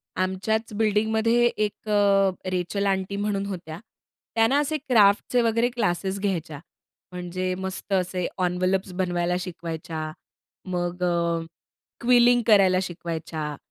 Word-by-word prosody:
आमच्याच 190 +4 -1
बिल्डिंगमध्ये 220 +2 +2
एक 215 -2 -2
अ, 200 -2 +4 0.2
रेचेल 185 +3 -1
आंटी 190 0 -1
म्हणून 200 -1 -1
होत्या. 175 -4 -6 0.6
त्या 225 0 +4
ना 280 +4 +3
असे 305 +1 0
क्राफ्टचे 240 -3 +3
वगैरे 230 +1 +2
क्लासेस 195 -5 -1
घ्यायच्या, 170 -7 -2 0.5
म्हणजे 180 +1 -3
मस्त 190 +1 -5
असे 185 -1 0 0.2
एन्व्हलप्स 185 +2 0
बनवायला 175 -1 0
शिकवायच्या. 165 -2 -5 0.5
मग 180 -1 -3
अ, 170 -1 0 0.6
क्विलिंग 245 0 +5
करायला 195 -4 +5
शिकवायच्या, 160 -3 -5
190 Hz, 115 wpm, -25 LUFS, 175-215 Hz, 0.6 s, क्विलिंग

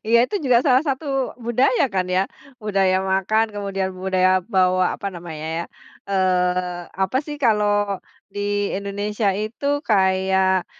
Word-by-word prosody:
Iya, 235 +1 +5
itu 410 - -3
juga 250 -3 +5
salah 260 -1 +4
satu 270 -1 -2
budaya 250 - +2
kan 185 -1 0
ya? 185 +1 +2 0.4
Budaya 195 -3 +2 0.2
makan, 205 +4 +2
kemudian 195 -2 -2
budaya 185 0 +1 0.2
bawa 185 0 +3
apa 200 - -6
namanya 160 -3 -7
ya, 170 - -3 0.5
eee, 180 -2 +1 0.2
apa 190 +6 0
sih 295 -1 -5
kalau 205 -3 +2 0.3
di 205 - -5 0.3
Indonesia 205 +1 -2
itu 215 +6 -4 0.2
kayak 190 -2 +2
195 Hz, 135 wpm, -22 LUFS, 185-215 Hz, 0.5 s, Iya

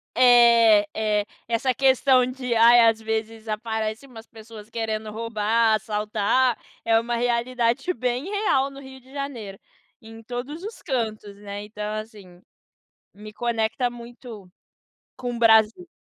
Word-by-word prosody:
É, 235 -4 +6
é. 210 -1 0 0.2
Essa 235 +3 0
questão 265 -1 +3
de, 250 -1 -4
ai, 235 +1 +6
às 225 -1 -2
vezes, 220 0 -4
aparece 220 +2 -3
umas 230 -4 -13
pessoas 220 -1 -13
querendo 220 -1 -4
roubar, 225 0 +1
assaltar, 215 +3 0 0.3
é 225 0 +3
uma 235 +1 -3
realidade 240 +5 0
bem 250 -1 -2
real 400 -10 +1
no 275 0 -12
Rio 265 -1 -12
de 260 +1 -21
Janeiro, 245 -9 -6 0.4
em 225 0 -12
todos 250 +8 -7
os 435 +3 -8
cantos, 215 - -4
né, 205 0 -7
então 210 0 -6
assim, 205 -5 -10 0.7
me 210 +1 -11
conecta 235 +2 -1
muito 235 -3 -11 0.7
com 245 -1 -5
o - - -6
Brasil. 225 +8 +4
230 Hz, 135 wpm, -24 LUFS, 215-250 Hz, 0.7 s, É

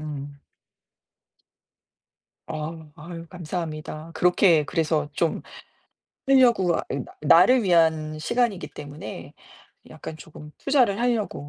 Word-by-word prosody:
음. 145 -2 -7 2.1
어우 155 0 -6
아유 165 +1 -9
감사합니다. 160 -2 -6
그렇게 175 -3 +4
그래서 155 -1 -1
좀 165 +1 -1 0.9
하려고 240 -10 +4
아 - - -2
이 140 - -2
나 - - -8
나를 185 - +6
위한 160 -4 +2
시간이기 205 -3 -1
때문에 145 -6 -9 0.6
약간 - - -8
조금 150 -1 -12
투자를 250 -8 +2
하려고 220 -12 -1
165 Hz, 230 characters per minute, -24 LUFS, 150-185 Hz, 2.1 s, 나를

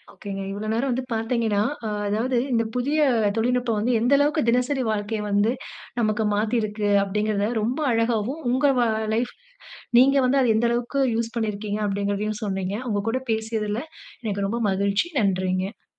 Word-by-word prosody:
ஒகேங்க. 195 -1 -6
இவ்வளோ 205 +2 -4
நேரம் 255 +4 0
வந்து 255 +1 -2
பார்த்தீங்கன்னா, 225 -2 0 0.2
ஆ - - -1 0.2
அதாவது 235 +5 0 0.2
இந்த 230 -1 +2
புதிய 285 +5 0 0.4
தொழில்நுட்பம் 240 -1 +1
வந்து 240 +4 +1
எந்த 245 +4 +1
அளவுக்கு 295 +2 +2
தினசரி 250 +3 +2
வாழ்க்கைய 210 +1 -2
வந்து 205 +2 +3 0.5
நமக்கு 215 -1 +1
மாத்திருக்கு. 215 -1 0
அப்படீங்கிறத 210 +1 0
ரொம்ப 250 +7 -1
அழகாவும், 230 +5 0
"உங்க 260 +3 +3
வா 240 -1 +3 0.3
லைஃப் 240 +2 -1 0.7
நீங்க 275 +2 +6
வந்து 270 +2 +3
அத 230 -3 +3
எந்த 235 +2 +2
அளவுக்கு 240 +3 -1
யூஸ் 230 +1 -2
பண்ணியிருக்கீங்க. 210 -1 -2
அப்படீங்கிறதையும் 205 +1 -2
சொன்னீங்க. 195 -1 -2 0.2
உங்க 205 -1 0
கூட 260 +2 -1
பேசியதில 220 0 -2 0.4
எனக்கு 200 -2 -1
ரொம்ப 235 +3 -2
மகிழ்ச்சி. 200 - +1
நன்றிங்க. 185 0 -1
220 Hz, 150 wpm, -24 LUFS, 205-245 Hz, 0.7 s, நீங்க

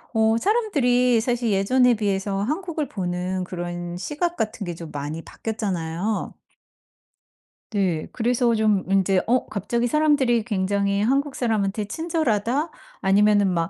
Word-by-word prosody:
어 220 0 +3
사람들이 250 - +2
사실 240 -1 0
예전에 245 +6 +4
비해서 200 -2 -1
한국을 310 - -2
보는 180 -1 -2
그런 175 -1 -5
시각 325 - -2
같은 215 -4 -2
게 175 - -4
좀 165 -1 -8
많이 145 +3 -5
바뀌었잖아요. 195 -2 -3 1.4
네. 185 -7 0
그래서 240 0 +1
좀 215 -3 +2
인제 195 -1 +3
어 250 +2 +2
갑자기 235 +4 -1
사람들이 265 -4 +2
굉장히 200 -1 0
한국 275 +5 +1
사람한테 215 -3 0
친절하다? 295 0 -1 0.3
아니면은 205 +1 +4
막 165 -1 0
215 Hz, 295 characters per minute, -23 LUFS, 195-250 Hz, 1.4 s, 예전에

